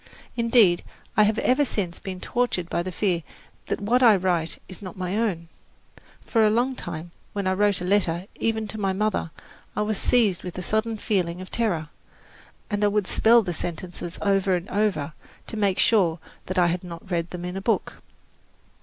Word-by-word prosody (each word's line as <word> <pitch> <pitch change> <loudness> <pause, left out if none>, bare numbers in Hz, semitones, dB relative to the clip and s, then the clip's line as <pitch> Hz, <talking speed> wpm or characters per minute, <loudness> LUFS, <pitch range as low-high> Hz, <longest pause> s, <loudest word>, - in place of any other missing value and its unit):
Indeed, 230 -7 +4 0.3
I - - +5
have 215 +1 +1
ever 260 +3 +3
since 190 -10 -2
been 185 -1 -6
tortured 240 -6 -1
by - - +1
the 185 +1 -4
fear 180 -2 0 0.5
that - - -1
what 230 +5 +2
I 230 -4 +7
write 175 -3 0
is 185 - -9
not 185 -2 -8
my 185 +1 -2
own. 195 -7 -1 0.8
For 225 -2 +3
a 215 - +5
long 245 +4 +1
time, 170 -6 -6 0.2
when 200 -1 -2
I 185 - +2
wrote 205 -1 +2
a - - -3
letter, 180 -2 +2
even 220 -1 0
to 220 - -6
my 195 -2 +1
mother, 210 -3 0 0.5
I 210 - +1
was 210 -1 -1
seized 215 -8 +3
with 180 -1 -7
a 180 - -4
sudden 220 +3 0
feeling 180 -6 -1
of 185 - -9
terror, 175 -10 0 0.8
and 205 0 0
I - - +5
would 205 -1 +1
spell 230 +4 +5
the 180 -3 -3
sentences 175 +1 -5
over 195 -2 +3
and 175 +1 -4
over, 185 -7 0 0.3
to - - -7
make 200 -3 +1
sure 180 -8 +3 0.3
that 185 - -3
I 180 - +5
had 175 +1 0
not 175 +1 -9
read 170 -1 0
them 180 -1 -6
in 180 +1 -4
a 195 - -3
book. 225 +3 -1
195 Hz, 195 wpm, -25 LUFS, 175-215 Hz, 0.8 s, I